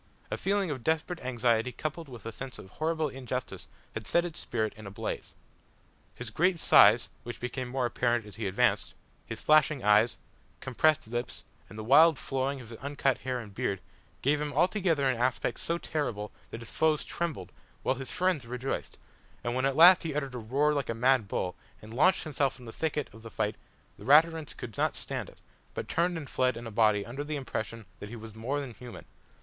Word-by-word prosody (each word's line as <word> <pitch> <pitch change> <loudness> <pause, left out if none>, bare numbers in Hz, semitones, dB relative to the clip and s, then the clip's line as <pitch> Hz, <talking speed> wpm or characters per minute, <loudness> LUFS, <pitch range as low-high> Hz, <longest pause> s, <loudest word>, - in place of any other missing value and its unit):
A - - 0
feeling 195 -3 0
of 130 -5 -5
desperate 160 +2 0
anxiety 120 -1 +1
coupled 155 +3 -5
with 120 -4 -11
a 115 - -4
sense 130 +2 -8
of 95 - -12
horrible 160 0 -1
injustice 130 -2 -5 0.3
had 110 - -6
set 170 - +3
his 175 -3 -5
spirit 110 -3 -2
in 110 -1 -10
a - - -5
blaze. 100 - -5 0.8
His 125 -3 -7
great 180 - +2
size, 110 -4 +6
which 120 0 -7
became 125 +1 -4
more 130 0 -1
apparent 120 -1 0
as 105 - -11
he 110 -2 -3
advanced, 95 - +1 0.3
his - - -6
flashing 155 -3 +4
eyes, 105 +3 +4 0.4
compressed 155 +3 +2
lips, 120 +2 -4 0.3
and 105 - -11
the 110 - -5
wild 150 +6 +6
flowing 135 +1 -2
of 120 -3 -11
his 115 - -10
uncut 140 -2 0
hair 130 0 -2
and 105 -4 -9
beard, 100 0 -1 0.4
gave 145 +2 +2
him 150 -1 -2
altogether 175 -6 +2
an 130 -2 +1
aspect 125 -1 0
so 170 - -1
terrible 125 -12 -3 0.2
that 115 - -7
his 115 - -10
foes 155 -1 +2
trembled, 155 - -4 0.3
while - - +2
his 130 -1 -6
friends 180 -9 0
rejoiced, 125 +2 -4 0.5
and 120 - -1
when 130 +1 0
at 135 -1 +1
last 175 +4 +9
he 160 -4 -4
uttered 140 -3 -2
a 125 - -4
roar 140 +7 +1
like 140 -2 -2
a 115 - -1
mad 125 -2 +3
bull, 90 -2 -2 0.2
and 110 +1 -11
launched 180 +9 +4
himself 140 -4 0
into 120 -3 -10
the - - -16
thickest 150 -5 -1
of 110 - -13
the 115 - -9
fight 105 -1 -1 0.4
the 100 - -11
Raturans 155 +2 +4
could 115 -5 -7
not - - +1
stand - - -4
it, - - -18 0.4
but - - -4
turned 175 +1 +1
and 150 -4 -6
fled 130 -1 +1
in 120 - -7
a 115 - -6
body 105 -1 +3
under 135 +5 -5
the 150 +1 -4
impression 115 -5 -4
that 105 - -8
he 120 - -7
was 110 -1 -9
more 120 +6 -2
than 135 -4 -6
human. 120 +1 -10
130 Hz, 210 wpm, -29 LUFS, 115-150 Hz, 0.8 s, last